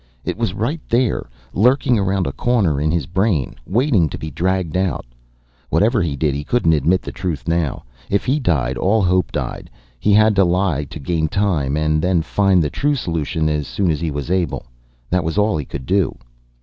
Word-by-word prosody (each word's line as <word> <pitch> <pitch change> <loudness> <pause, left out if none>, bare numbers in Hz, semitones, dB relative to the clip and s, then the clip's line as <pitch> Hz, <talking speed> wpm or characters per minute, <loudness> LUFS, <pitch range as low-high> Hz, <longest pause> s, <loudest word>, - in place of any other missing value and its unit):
It - - -2
was 110 -4 -2
right 140 +10 -2
there, 120 - +1 0.2
lurking 125 +2 +3
around 95 -1 0
a 70 - -2
corner 95 - +1
in 75 - +1
his 80 -3 0
brain, 95 - 0
waiting 110 - +2
to - - -6
be 80 - -6
dragged 90 +1 -1
out. 95 -9 -1 0.6
Whatever 110 +7 +2
he 80 -5 -1
did, 75 0 0
he 70 +1 -3
couldn't 85 -2 +2
admit 80 +5 +2
the - - -6
truth 85 -6 -4
now. 85 -3 -1 0.3
If 100 - 0
he 135 +4 +1
died 65 - 0
all 100 +8 +2
hope 90 -5 +2
died. - - -4 0.3
He 105 - +2
had 110 0 +5
to 95 - +6
lie 85 -4 +1
to 75 - -9
gain 80 +2 -1
time, 80 -7 0 0.3
then 90 -1 +1
find 95 -1 +2
the 75 - -2
true 145 +1 0
solution 80 - -1
as 75 -2 -1
soon 95 -4 0
as 75 - -2
he 85 - -1
was 70 +2 -4
able. 90 -2 -1 0.5
That 90 -1 +2
was 80 +4 -3
all 105 -2 +2
he 75 -3 -3
could 65 -1 -7
do. 95 -1 +1
90 Hz, 200 wpm, -19 LUFS, 75-100 Hz, 0.6 s, to